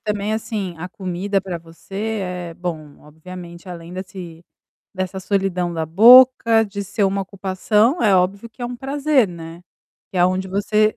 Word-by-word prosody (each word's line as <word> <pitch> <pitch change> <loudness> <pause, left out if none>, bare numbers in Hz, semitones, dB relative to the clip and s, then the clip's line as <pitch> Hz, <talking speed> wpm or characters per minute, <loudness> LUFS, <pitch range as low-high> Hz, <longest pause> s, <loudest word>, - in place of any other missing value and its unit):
também 210 0 -2
assim, 215 -4 -3
a 180 +3 -6
comida 190 +2 -2
para 185 -3 -5
você 195 +6 -5
é 180 -2 -5
bom, 160 -4 -6
obviamente 170 +3 -11
além 170 -1 -9
desse 180 -3 -8 0.5
dessa 185 0 -4
solidão 185 -3 -1
da 160 -1 -2
boca, 230 +4 +7
de 200 -1 -5
ser 200 +1 -1
uma 195 +1 0
ocupação, 200 - 0
é 205 -4 +4
óbvio 195 +5 0
que 230 - -24
é - - -1
um 245 - -6
prazer, 275 -2 +1
né. 170 0 -10 0.5
Que - - -7
é - - +2
aonde 185 +1 +1
você 210 +2 +1
190 Hz, 165 wpm, -20 LUFS, 175-215 Hz, 0.5 s, boca